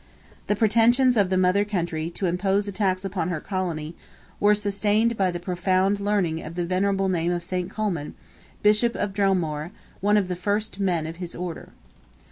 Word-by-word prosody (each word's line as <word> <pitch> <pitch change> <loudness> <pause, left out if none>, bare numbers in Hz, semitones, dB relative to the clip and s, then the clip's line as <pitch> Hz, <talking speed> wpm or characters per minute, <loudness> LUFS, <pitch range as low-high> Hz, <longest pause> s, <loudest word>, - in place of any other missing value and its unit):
The 205 - +2
pretensions 235 +4 +4
of 200 -4 +3
the 185 - +1
mother 185 +2 +3
country 170 -5 -2
to 180 +3 -4
impose 195 +3 +1
a - - -3
tax 190 -1 0
upon 180 -3 -2
her 170 -3 -2
Colony, 170 -4 -3 0.5
were 210 0 +5
sustained 210 +3 +1
by 190 -3 +1
the 175 -1 -4
profound 185 +2 +1
learning 200 -6 0
and 160 +2 -8
venerable 190 +2 0
name 175 -2 0
of 175 -1 -2
St. 180 0 -3
Colman, 190 -9 -3 0.5
Bishop 215 +3 +4
of 205 -1 -2
Dromore, 175 -6 0 0.3
one 205 +2 +3
of 200 -3 +1
the 180 - -2
first 205 +3 -2
men 175 -5 0
of 165 +1 -6
his 175 -1 -7
Order. 175 -2 -6
190 Hz, 175 wpm, -24 LUFS, 175-205 Hz, 0.5 s, were